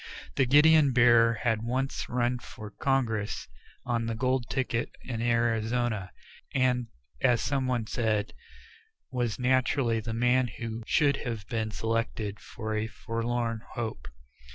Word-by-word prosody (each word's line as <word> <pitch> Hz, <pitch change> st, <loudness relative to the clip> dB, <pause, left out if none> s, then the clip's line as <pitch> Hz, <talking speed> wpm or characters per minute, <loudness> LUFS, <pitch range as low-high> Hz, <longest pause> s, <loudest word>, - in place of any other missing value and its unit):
The 130 Hz, -, +3 dB
guidon 150 Hz, 0 st, +6 dB
bearer 120 Hz, -1 st, +5 dB
had 115 Hz, -3 st, +1 dB
once 130 Hz, +4 st, -2 dB
run 125 Hz, 0 st, 0 dB
for 105 Hz, -3 st, -10 dB
Congress 115 Hz, -7 st, -1 dB, 0.4 s
on 115 Hz, -2 st, -1 dB
the 115 Hz, -, -2 dB
gold 130 Hz, +1 st, 0 dB
ticket 125 Hz, -3 st, -1 dB
in 115 Hz, -3 st, -4 dB
Arizona, 115 Hz, -3 st, 0 dB, 0.5 s
and, 125 Hz, -2 st, +2 dB, 0.3 s
as 125 Hz, -3 st, +4 dB
some 135 Hz, 0 st, 0 dB
one 120 Hz, -3 st, 0 dB
said, 110 Hz, -2 st, -1 dB, 0.8 s
was 120 Hz, -4 st, -1 dB
naturally 130 Hz, -2 st, +2 dB
the 110 Hz, +1 st, -4 dB
man 125 Hz, +2 st, +3 dB
who 115 Hz, -1 st, -5 dB
should 140 Hz, -3 st, +3 dB
have 115 Hz, -5 st, -5 dB
been 110 Hz, -2 st, -1 dB
selected 110 Hz, -2 st, -2 dB
for 110 Hz, -1 st, -5 dB
a 110 Hz, +1 st, -1 dB
forlorn 115 Hz, 0 st, -2 dB
hope. 110 Hz, -, -4 dB
120 Hz, 130 wpm, -28 LUFS, 115-125 Hz, 0.8 s, guidon